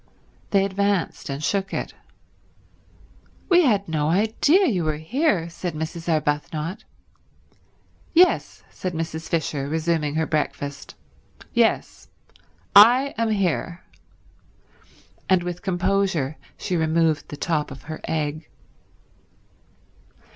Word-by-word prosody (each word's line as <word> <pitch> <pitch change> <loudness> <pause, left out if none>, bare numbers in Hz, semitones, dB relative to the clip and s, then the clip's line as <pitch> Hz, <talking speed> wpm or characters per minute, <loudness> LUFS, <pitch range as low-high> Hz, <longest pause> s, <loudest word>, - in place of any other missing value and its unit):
They 195 -1 +3
advanced 200 -4 -1
and 140 +2 -4
shook 195 +3 -1
it. - - -4 1.6
"We 355 -1 +6
had 205 -6 +2
no 155 -2 0
idea 225 - +3
you 190 - +1
were 155 -1 -1
here," 195 - 0
said 170 0 -5
Mrs. 160 +2 -5
Arbuthnot. 155 +4 -2 1.3
"Yes," 355 +2 +3
said 180 -2 -5
Mrs. 160 0 -4
Fisher, 150 -4 -1
resuming 160 -1 0
her 160 0 +1
breakfast. 145 -2 -3 0.6
"Yes. - - +1 0.7
I 245 +7 +7
am 230 -1 +1
here." 180 -4 -1 1.5
And 185 -2 +4
with 180 0 -5
composure 185 -5 0 0.2
she 180 - -3
removed 160 -1 +1
the 145 - -7
top 155 -2 -1
of 135 -1 -10
her 155 +1 -7
egg. 155 0 -3
170 Hz, 105 wpm, -23 LUFS, 155-195 Hz, 1.6 s, I